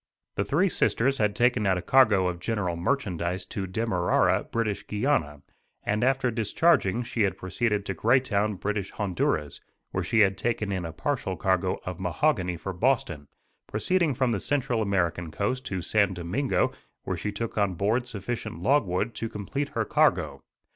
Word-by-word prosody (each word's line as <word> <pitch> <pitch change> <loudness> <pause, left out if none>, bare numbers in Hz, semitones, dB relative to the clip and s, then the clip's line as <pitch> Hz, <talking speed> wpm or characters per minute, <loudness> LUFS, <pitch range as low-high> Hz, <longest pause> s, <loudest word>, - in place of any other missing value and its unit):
The - - 0
Three 175 +8 +2
Sisters 135 -6 +1
had 105 -2 +1
taken 120 -2 +2
out 95 -1 +3
a - - -2
cargo 110 -8 +4
of 90 -1 -3
general 90 -3 -1
merchandise 90 -3 -1
to 95 -2 -4
Demerara, 95 -2 +1
British 110 -3 -2
Guiana, 105 - 0 0.4
and 105 +2 0
after 130 -1 +2
discharging 115 - +2
she 120 -1 -3
had 100 -2 +1
proceeded 105 +2 -1
to 95 - -2
Greytown, 110 -1 +2
British 100 +1 -2
Honduras, 90 -7 -2 0.3
where - - -1
she 115 - +3
had 100 -1 +3
taken 110 -3 -1
in 95 -3 -2
a 80 - -5
partial 105 - -2
cargo 95 +2 0
of 90 -1 -5
mahogany 90 - 0
for 95 +4 -5
Boston, 90 - 0 0.4
proceeding 165 - +1
from 130 -1 +1
the 105 - 0
Central 130 -1 0
American 90 -5 0
coast 125 +10 -2
to 95 -3 -3
San 100 0 +2
Domingo 90 +11 0 0.3
where - - -2
she 105 - -3
took 115 +3 -4
on 100 -3 +1
board 110 +7 0
sufficient 115 -5 -5
logwood 110 -2 +1
to 115 - -4
complete 135 +9 -4
her - - +1
cargo. - - +2
105 Hz, 165 wpm, -27 LUFS, 95-120 Hz, 0.4 s, cargo